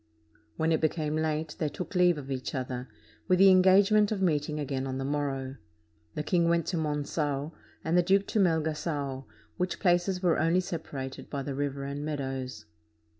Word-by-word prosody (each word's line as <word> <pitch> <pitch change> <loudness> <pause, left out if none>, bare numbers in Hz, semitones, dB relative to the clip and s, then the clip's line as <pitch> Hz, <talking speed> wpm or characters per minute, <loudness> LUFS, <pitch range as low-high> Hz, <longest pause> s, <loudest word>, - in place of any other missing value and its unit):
When 160 +1 +1
it 160 - +2
became 155 -1 0
late, 155 -1 -1
they 155 - 0
took 170 +4 -7
leave 180 -3 +4
of 140 -1 -7
each 130 +1 -3
other, 130 -1 -4 0.4
with 185 -1 +4
the 195 +1 +7
engagement 195 +3 +5
of 210 - -1
meeting 150 -4 0
again 135 -2 -2
on 130 0 -3
the 135 - -3
morrow. 135 -2 -2 0.6
The 150 - -2
king 170 +1 +2
went 170 -2 +2
to 185 - -1
Mongao, 150 -1 -2 0.3
and 160 +2 0
the 180 - +6
duke 195 +3 +3
to 220 - +1
Melga^o, 155 -6 0 0.3
which 180 -1 -2
places 180 +1 +1
were 175 -3 +3
only 165 +3 +3
separated 145 -7 -5
by 140 -2 -3
the 140 - -4
river 140 0 -3
and 140 +1 -4
meadows. 135 -6 -4
155 Hz, 175 wpm, -29 LUFS, 140-175 Hz, 0.6 s, the